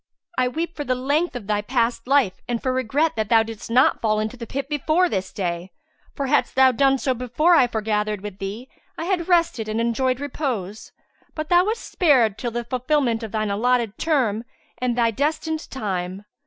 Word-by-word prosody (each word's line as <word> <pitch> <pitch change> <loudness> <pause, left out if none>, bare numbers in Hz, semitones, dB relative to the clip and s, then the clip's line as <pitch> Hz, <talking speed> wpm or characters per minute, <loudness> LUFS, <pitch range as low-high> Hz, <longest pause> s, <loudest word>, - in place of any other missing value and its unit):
I 255 - +2
weep 325 +6 -3
for 295 - -3
the 255 -2 0
length 285 +7 0
of 240 -5 -6
thy 205 0 0
past 235 +2 -1
life 265 -9 +2
and 240 -1 -1
for 260 +1 -1
regret 265 +6 +1
that 220 -2 -2
thou 225 -1 +5
didst 225 -1 -8
not 250 +3 +3
fall 215 -1 +1
into 215 +3 -3
the 235 -2 -8
pit 275 +3 -4
before 310 +5 +2
this 190 - -2
day; 175 -1 -3 0.4
for 280 - -2
hadst 290 +2 +1
thou 265 0 +6
done 270 +2 +3
so 260 0 0
before 250 +8 +2
I 265 -7 +6
foregathered 210 -2 -1
with 205 -2 -8
thee, 205 +6 -5 0.3
I 330 - -4
had 355 -2 -1
rested 335 -11 +2
and 215 +1 -1
enjoyed 250 +2 0
repose: 250 - -4 0.4
but 310 0 -4
thou 355 +1 +5
wast 450 +2 -2
spared 255 - +2
till 240 - -2
the 240 +1 -3
fulfilment 255 -1 0
of 220 -2 -6
thine 215 -2 -1
allotted 235 0 +1
term 245 -9 +1 0.4
and 245 -1 -1
thy 230 -1 +3
destined 310 +5 -2
time." 190 -5 -4
245 Hz, 195 wpm, -23 LUFS, 215-285 Hz, 0.4 s, thou